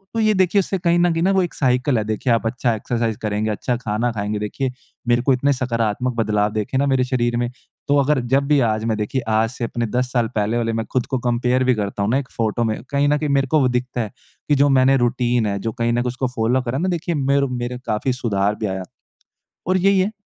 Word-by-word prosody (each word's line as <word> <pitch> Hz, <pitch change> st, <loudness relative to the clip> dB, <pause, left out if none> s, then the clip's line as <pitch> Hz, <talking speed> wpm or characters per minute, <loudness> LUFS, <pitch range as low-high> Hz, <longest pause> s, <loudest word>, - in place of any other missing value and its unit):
तो -, -, 0 dB
ये 215 Hz, -1 st, +3 dB
देखिए 190 Hz, 0 st, +3 dB
उससे 195 Hz, 0 st, -1 dB
कहीं 170 Hz, -1 st, +2 dB
न 175 Hz, 0 st, +3 dB
कहीं 165 Hz, 0 st, 0 dB
न 190 Hz, -, +3 dB
वो 190 Hz, -, +3 dB
एक 175 Hz, -, -4 dB
साइकल 125 Hz, 0 st, +1 dB
है। 110 Hz, -, 0 dB
देखिए 110 Hz, +4 st, -1 dB
आप 115 Hz, -, 0 dB
अच्छा 120 Hz, +1 st, 0 dB
एक्सरसाइज़ 115 Hz, 0 st, -2 dB
करेंगे, 105 Hz, 0 st, -1 dB
अच्छा 120 Hz, +4 st, -1 dB
खाना 115 Hz, +1 st, -1 dB
खाएँगे। 105 Hz, -1 st, -3 dB
देखिए 125 Hz, +5 st, -2 dB, 0.4 s
मेरे 120 Hz, 0 st, +3 dB
को 135 Hz, +2 st, +3 dB
इतने 140 Hz, +3 st, +2 dB
सकारात्मक 125 Hz, -1 st, -1 dB
बदलाव 105 Hz, -2 st, +1 dB
देखे 110 Hz, +4 st, -2 dB
ना 140 Hz, -, +2 dB
मेरे 130 Hz, -2 st, +2 dB
शरीर 120 Hz, -2 st, 0 dB
में 120 Hz, 0 st, -1 dB, 0.4 s
तो 145 Hz, 0 st, +3 dB
अगर 145 Hz, 0 st, +2 dB
जब 140 Hz, +1 st, +4 dB
भी 150 Hz, -1 st, +4 dB
आज 110 Hz, 0 st, -1 dB
मैं 110 Hz, -2 st, 0 dB
देखिए 110 Hz, +5 st, -2 dB
आज 110 Hz, +1 st, +2 dB
से 125 Hz, 0 st, -7 dB
अपने 120 Hz, 0 st, -2 dB
10 125 Hz, 0 st, 0 dB
साल 120 Hz, -3 st, +2 dB
पहले 110 Hz, +2 st, 0 dB
वाले 115 Hz, -1 st, -1 dB
मैं 115 Hz, 0 st, -2 dB
ख़ुद 125 Hz, -2 st, +1 dB
को 135 Hz, -2 st, -1 dB
कंपेयर 125 Hz, +1 st, +1 dB
भी 130 Hz, 0 st, +3 dB
करता 100 Hz, -1 st, -2 dB
हूँ 100 Hz, -, 0 dB
ना 130 Hz, -, +3 dB
एक 135 Hz, -2 st, -4 dB
फ़ोटो 115 Hz, +1 st, 0 dB
में 110 Hz, -1 st, -1 dB
कहीं 140 Hz, 0 st, +2 dB
न 150 Hz, -, +3 dB
कहीं 150 Hz, 0 st, -2 dB
मेरे 135 Hz, -1 st, +2 dB
को 155 Hz, +4 st, +3 dB
वो 130 Hz, -, +3 dB
दिखता 125 Hz, 0 st, -2 dB
है 110 Hz, -3 st, -4 dB, 0.4 s
कि 145 Hz, -, +4 dB
जो 140 Hz, +1 st, +4 dB
मैंने 135 Hz, 0 st, +4 dB
रूटीन 120 Hz, -1 st, +1 dB
है, 100 Hz, -1 st, -1 dB
जो 115 Hz, +3 st, -3 dB
कहीं 120 Hz, 0 st, -1 dB
न -, -, +1 dB
कहीं 120 Hz, -, +1 dB
उसको 130 Hz, +1 st, -2 dB
फ़ॉलो 125 Hz, +1 st, 0 dB
करा 125 Hz, +1 st, -3 dB
है -, -, -2 dB
ना 185 Hz, -, +1 dB
देखिए 175 Hz, -1 st, -2 dB
मेरे 140 Hz, 0 st, +2 dB
मेरे 120 Hz, 0 st, -3 dB
काफ़ी 110 Hz, +5 st, 0 dB
सुधार 105 Hz, -4 st, 0 dB
भी 110 Hz, -, -4 dB
आया। 95 Hz, -2 st, -3 dB, 0.8 s
और 185 Hz, +1 st, +3 dB
यही 195 Hz, +1 st, +3 dB
है 190 Hz, +3 st, +1 dB
125 Hz, 260 wpm, -21 LUFS, 110-135 Hz, 0.8 s, जब